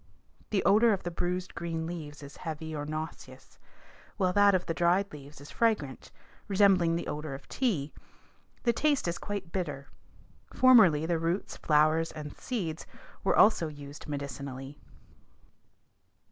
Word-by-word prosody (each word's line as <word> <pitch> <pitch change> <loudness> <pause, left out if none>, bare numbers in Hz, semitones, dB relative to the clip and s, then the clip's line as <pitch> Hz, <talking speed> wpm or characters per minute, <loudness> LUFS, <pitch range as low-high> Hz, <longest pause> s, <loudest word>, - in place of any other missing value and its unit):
The 200 -3 +1
odor 215 +3 +5
of 195 - -3
the 175 - -3
bruised 180 +2 -3
green 165 -1 -3
leaves 155 -4 -7
is 140 0 -11
heavy 160 -1 -5
or 145 0 -4
nauseous, 155 +1 -7 0.6
while 185 -3 +1
that 205 0 +5
of 180 - 0
the 165 - -2
dried 180 +3 +2
leaves 145 0 -11
is 145 - -12
fragrant, 210 - 0 0.4
resembling 190 -4 +4
the 170 - -3
odor 150 -2 -4
of 135 - -12
tea. 180 - -1 0.7
The 235 - +3
taste 290 -3 +1
is 170 - -2
quite 200 -4 -5
bitter. 145 -7 -4 0.7
Formerly 210 -12 +6
the 165 0 0
roots, 170 +4 -2
flowers 155 +2 +2
and 150 -2 -7
seeds 175 -11 -4 0.4
were - - +2
also 205 -6 +5
used 145 0 -10
medicinally. 140 -1 -6
165 Hz, 145 wpm, -29 LUFS, 150-195 Hz, 0.7 s, Formerly